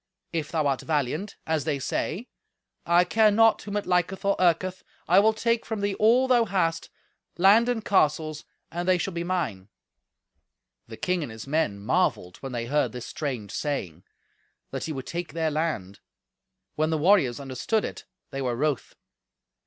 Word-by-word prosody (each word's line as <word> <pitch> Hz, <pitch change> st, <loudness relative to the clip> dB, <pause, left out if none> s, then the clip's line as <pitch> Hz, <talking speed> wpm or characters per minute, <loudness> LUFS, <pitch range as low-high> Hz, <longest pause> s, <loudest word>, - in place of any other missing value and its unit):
If 160 Hz, -3 st, -2 dB
thou 160 Hz, -3 st, 0 dB
art 135 Hz, -2 st, +1 dB
valiant, 155 Hz, +6 st, -2 dB
as 160 Hz, -2 st, 0 dB
they 150 Hz, -1 st, -1 dB
say, 175 Hz, -, -3 dB, 0.6 s
I 170 Hz, +1 st, +5 dB
care 215 Hz, +4 st, +4 dB
not 225 Hz, +2 st, +4 dB
whom 205 Hz, 0 st, -4 dB
it 205 Hz, -, -2 dB
liketh 180 Hz, +2 st, 0 dB
or 200 Hz, -, +3 dB
irketh, 185 Hz, +1 st, +2 dB, 0.3 s
I 180 Hz, +3 st, +6 dB
will 215 Hz, +2 st, +5 dB
take 230 Hz, +1 st, 0 dB
from 220 Hz, -3 st, -4 dB
thee 200 Hz, 0 st, 0 dB
all 235 Hz, +6 st, +4 dB
thou 245 Hz, -3 st, +4 dB
hast, 175 Hz, -5 st, -1 dB, 0.5 s
land 210 Hz, +6 st, +5 dB
and 225 Hz, -3 st, -1 dB
castles, 155 Hz, -4 st, +1 dB, 0.3 s
and 175 Hz, +2 st, -3 dB
they 185 Hz, -1 st, +4 dB
shall 185 Hz, +2 st, -3 dB
be 170 Hz, 0 st, -2 dB
mine." 150 Hz, -, -2 dB, 1.2 s
The -, -, -9 dB
king 180 Hz, -1 st, 0 dB
and 140 Hz, -7 st, -5 dB
his 110 Hz, -1 st, -8 dB
men 140 Hz, -8 st, 0 dB
marvelled 90 Hz, -2 st, 0 dB
when 135 Hz, -, -7 dB
they 120 Hz, -1 st, -3 dB
heard 135 Hz, -2 st, 0 dB
this 125 Hz, -1 st, -6 dB
strange 125 Hz, -9 st, -4 dB
saying, 95 Hz, -, -3 dB, 0.7 s
that -, -, -4 dB
he 160 Hz, -, -4 dB
would 135 Hz, -3 st, -5 dB
take 170 Hz, 0 st, -5 dB
their 160 Hz, -1 st, 0 dB
land; 150 Hz, -, -2 dB, 0.7 s
when 155 Hz, +1 st, 0 dB
the 160 Hz, -, +1 dB
warriors 150 Hz, -6 st, +3 dB
understood 140 Hz, -, -1 dB
it -, -, -7 dB, 0.3 s
they 135 Hz, -1 st, -4 dB
were 125 Hz, -2 st, -1 dB
wroth. 145 Hz, +1 st, -1 dB
165 Hz, 175 wpm, -26 LUFS, 140-195 Hz, 1.2 s, I